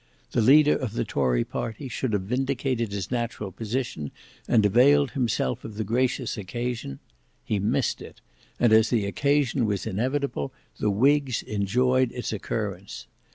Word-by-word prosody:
The -, -, +2 dB
leader 145 Hz, +6 st, +6 dB
of 125 Hz, -6 st, -3 dB
the 115 Hz, -, -1 dB
tory 65 Hz, -, +1 dB
party 115 Hz, +5 st, -5 dB
should 130 Hz, -2 st, -3 dB
have 100 Hz, -2 st, 0 dB
vindicated 125 Hz, 0 st, -1 dB
his 100 Hz, 0 st, -4 dB
natural 115 Hz, -5 st, -3 dB
position, 110 Hz, -, -3 dB, 0.4 s
and 110 Hz, -3 st, +4 dB
availed 135 Hz, +6 st, +5 dB
himself 115 Hz, -, -1 dB
of 110 Hz, -, -8 dB
the 110 Hz, -, -2 dB
gracious 125 Hz, +3 st, 0 dB
occasion: 115 Hz, -, -4 dB, 0.5 s
he 105 Hz, -, -1 dB
missed 100 Hz, -, 0 dB
it; -, -, -11 dB, 0.4 s
and 120 Hz, -2 st, +4 dB
as 110 Hz, 0 st, +5 dB
the 110 Hz, -5 st, +1 dB
occasion 140 Hz, +2 st, +1 dB
was 100 Hz, -2 st, -2 dB
inevitable, 125 Hz, -, -2 dB, 0.3 s
the 105 Hz, -, +1 dB
whigs 135 Hz, +4 st, +2 dB
enjoyed 125 Hz, +5 st, +1 dB
its 125 Hz, -2 st, -4 dB
occurrence. 100 Hz, -2 st, -4 dB
115 Hz, 150 wpm, -26 LUFS, 100-130 Hz, 0.5 s, leader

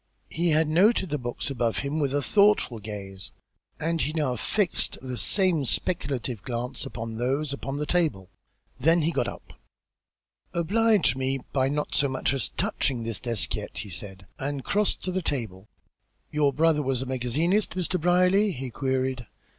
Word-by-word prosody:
He 170 Hz, +2 st, +1 dB
had 155 Hz, 0 st, +3 dB
noted 190 Hz, +4 st, +3 dB
the 150 Hz, -, 0 dB
books 120 Hz, +3 st, -3 dB
above 120 Hz, -3 st, 0 dB
him 145 Hz, +3 st, -1 dB
with 140 Hz, -3 st, +1 dB
a 145 Hz, 0 st, 0 dB
thoughtful 200 Hz, -, +3 dB
gaze, 100 Hz, -2 st, -7 dB, 0.5 s
and 165 Hz, +1 st, 0 dB
he 150 Hz, -, 0 dB
now 150 Hz, -6 st, 0 dB
fixed 195 Hz, -, 0 dB
that 130 Hz, -2 st, -5 dB
same 185 Hz, -6 st, +2 dB
speculative 135 Hz, -, -2 dB
glance 120 Hz, +3 st, -4 dB
upon 115 Hz, 0 st, -6 dB
those 135 Hz, +4 st, -1 dB
upon 140 Hz, 0 st, -4 dB
the 150 Hz, -, -2 dB
table. 150 Hz, -, 0 dB, 0.5 s
Then 165 Hz, +5 st, +4 dB
he 165 Hz, -, +2 dB
got -, -, 0 dB
up. -, -, -9 dB, 1.0 s
"Oblige 200 Hz, -, +3 dB
me 135 Hz, +1 st, 0 dB, 0.2 s
by 130 Hz, -1 st, +2 dB
not 150 Hz, +1 st, -2 dB
so 140 Hz, -, +3 dB
much 130 Hz, 0 st, 0 dB
as 135 Hz, -4 st, 0 dB
touching 125 Hz, -4 st, -1 dB
this 115 Hz, -2 st, -4 dB
desk 120 Hz, -3 st, 0 dB
yet," -, -, -5 dB
he 105 Hz, -, -5 dB
said, 95 Hz, +2 st, -7 dB
and 140 Hz, 0 st, -3 dB
crossed 210 Hz, 0 st, +1 dB
to 185 Hz, -, -1 dB
the 185 Hz, +1 st, -1 dB
table. 110 Hz, -, -3 dB, 0.6 s
"Your 150 Hz, -2 st, +3 dB
brother 155 Hz, +1 st, +3 dB
was 130 Hz, -2 st, 0 dB
a -, -, -7 dB
magazinist, 145 Hz, -, 0 dB
Mr. 185 Hz, -1 st, -1 dB
Brierly?" 180 Hz, +4 st, +4 dB
he 130 Hz, -3 st, -5 dB
queried. 130 Hz, -1 st, -1 dB
140 Hz, 170 wpm, -26 LUFS, 125-170 Hz, 1.0 s, Then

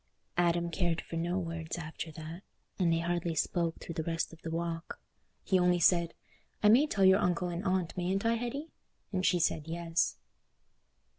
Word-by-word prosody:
Adam 170 Hz, 0 st, +2 dB
cared 170 Hz, -1 st, 0 dB
for -, -, -7 dB
no 170 Hz, +2 st, 0 dB
words 165 Hz, -2 st, -4 dB
after 160 Hz, 0 st, -6 dB
that, 160 Hz, +3 st, -8 dB, 0.4 s
and 175 Hz, -3 st, +3 dB
they 165 Hz, -, +3 dB
hardly 170 Hz, 0 st, -1 dB
spoke 165 Hz, +1 st, 0 dB
through 170 Hz, -, -7 dB
the 160 Hz, -, -2 dB
rest 165 Hz, +1 st, -2 dB
of 165 Hz, -, -14 dB
the 165 Hz, -, -5 dB
walk. 165 Hz, 0 st, -3 dB, 0.4 s
He 190 Hz, -, +3 dB
only 180 Hz, 0 st, +4 dB
said, 170 Hz, 0 st, +3 dB, 0.5 s
"I 210 Hz, -, +7 dB
may 260 Hz, +8 st, +6 dB
tell 200 Hz, -9 st, +2 dB
your 190 Hz, +1 st, +7 dB
uncle 180 Hz, 0 st, +1 dB
and 175 Hz, +2 st, -4 dB
aunt, 185 Hz, -3 st, 0 dB
mayn't 185 Hz, +3 st, -1 dB
I, 230 Hz, -, +4 dB
Hetty?" 245 Hz, +7 st, -3 dB, 0.4 s
and 185 Hz, -1 st, 0 dB
she 180 Hz, -1 st, +3 dB
said, 155 Hz, -1 st, 0 dB
"Yes." 165 Hz, 0 st, 0 dB
170 Hz, 180 wpm, -31 LUFS, 165-185 Hz, 0.5 s, I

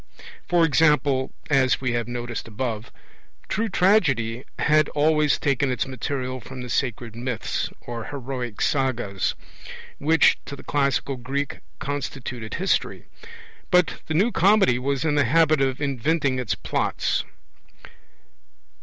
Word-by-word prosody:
For 175 Hz, -2 st, +4 dB
example, 150 Hz, -4 st, +3 dB, 0.2 s
as 135 Hz, -3 st, +3 dB
we 125 Hz, -2 st, -1 dB
have 120 Hz, -1 st, -1 dB
noticed 120 Hz, -1 st, -5 dB
above, 115 Hz, +1 st, -4 dB, 0.6 s
true 225 Hz, +2 st, -1 dB
Tragedy 135 Hz, -, +2 dB
had 155 Hz, 0 st, +3 dB
always 150 Hz, 0 st, +2 dB
taken 140 Hz, -1 st, +1 dB
its 125 Hz, -4 st, 0 dB
material 130 Hz, 0 st, -4 dB
from 130 Hz, +3 st, -9 dB
the 125 Hz, -, -7 dB
sacred 120 Hz, -4 st, -2 dB
myths, 120 Hz, -1 st, -2 dB
or 115 Hz, -2 st, -6 dB
heroic 125 Hz, -5 st, -5 dB
sagas, 120 Hz, -8 st, 0 dB, 0.6 s
which 160 Hz, +1 st, +4 dB
to 140 Hz, -, -6 dB
the -, -, -12 dB
classical 140 Hz, -1 st, 0 dB
Greek 140 Hz, +3 st, -3 dB, 0.2 s
constituted 130 Hz, -5 st, -5 dB
history. -, -, 0 dB, 0.6 s
But 180 Hz, -1 st, +2 dB
the 155 Hz, -, -2 dB
New 205 Hz, +9 st, +3 dB
Comedy 195 Hz, -, +4 dB
was 140 Hz, +3 st, -1 dB
in 155 Hz, -, +2 dB
the 145 Hz, -1 st, +3 dB
habit 155 Hz, +2 st, +4 dB
of 135 Hz, -1 st, 0 dB
inventing 140 Hz, 0 st, 0 dB
its 125 Hz, -, -1 dB
plots. -, -, -1 dB
135 Hz, 130 wpm, -24 LUFS, 125-150 Hz, 0.6 s, For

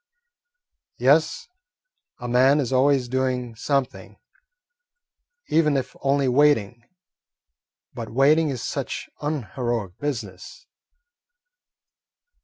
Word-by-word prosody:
"Yes, 470 Hz, -1 st, +2 dB, 0.7 s
a 120 Hz, -, -7 dB
man 130 Hz, +4 st, +4 dB
is 135 Hz, -2 st, -2 dB
always 130 Hz, -1 st, +3 dB
doing 125 Hz, -1 st, -2 dB
something, 135 Hz, +2 st, -3 dB, 1.3 s
even 150 Hz, -3 st, +2 dB
if 130 Hz, -, -4 dB
only 140 Hz, 0 st, +1 dB
waiting; 125 Hz, -4 st, +2 dB, 1.1 s
but 115 Hz, -2 st, -7 dB
waiting 150 Hz, +6 st, +3 dB
is 130 Hz, -4 st, -4 dB
such -, -, -4 dB
unheroic 120 Hz, -, -3 dB
business." 145 Hz, -, -6 dB
130 Hz, 80 wpm, -23 LUFS, 120-145 Hz, 1.3 s, man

